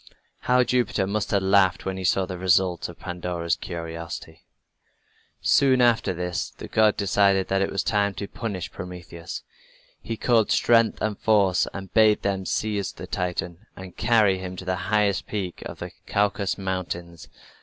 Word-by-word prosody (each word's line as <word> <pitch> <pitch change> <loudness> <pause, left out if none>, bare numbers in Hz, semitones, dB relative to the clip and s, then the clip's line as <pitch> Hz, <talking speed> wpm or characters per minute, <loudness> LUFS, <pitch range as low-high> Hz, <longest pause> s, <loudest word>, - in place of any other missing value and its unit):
How 125 0 +3
Jupiter 120 -5 +1
must 105 +1 -2
have 100 -2 +1
laughed 95 -1 +3
when 95 0 -2
he 95 - -5
saw 95 +1 +2
the 90 -1 -6
result 90 -1 +2
of - - -11
Pandora's 85 -1 -2
curiosity! 85 -1 -7 0.9
Soon 135 -2 +4
after 120 -5 +3
this 90 0 -3
the - - -10
god 110 -1 +3
decided 100 -1 +2
that 95 0 +1
it 95 - +1
was 100 -1 -1
time 100 -2 +1
to 100 - -5
punish 100 -7 -5
Prometheus. 85 -2 -8 0.6
He 115 - -5
called 115 -3 +2
Strength 115 -2 +3
and 105 -1 -1
Force 100 -4 +3
and 95 -1 -8
bade 110 -1 +4
them 95 -1 -1
seize 105 -3 -1
the - - -8
Titan 90 +2 -4
and 95 -1 -10
carry 110 -4 +3
him 95 0 -6
to 95 - -8
the 95 0 0
highest 105 -2 +1
peak 95 -5 -4
of - - -9
the - - -7 0.2
Caucasus 100 -1 0
Mountains. 90 -3 -5
95 Hz, 165 wpm, -25 LUFS, 90-105 Hz, 0.9 s, Soon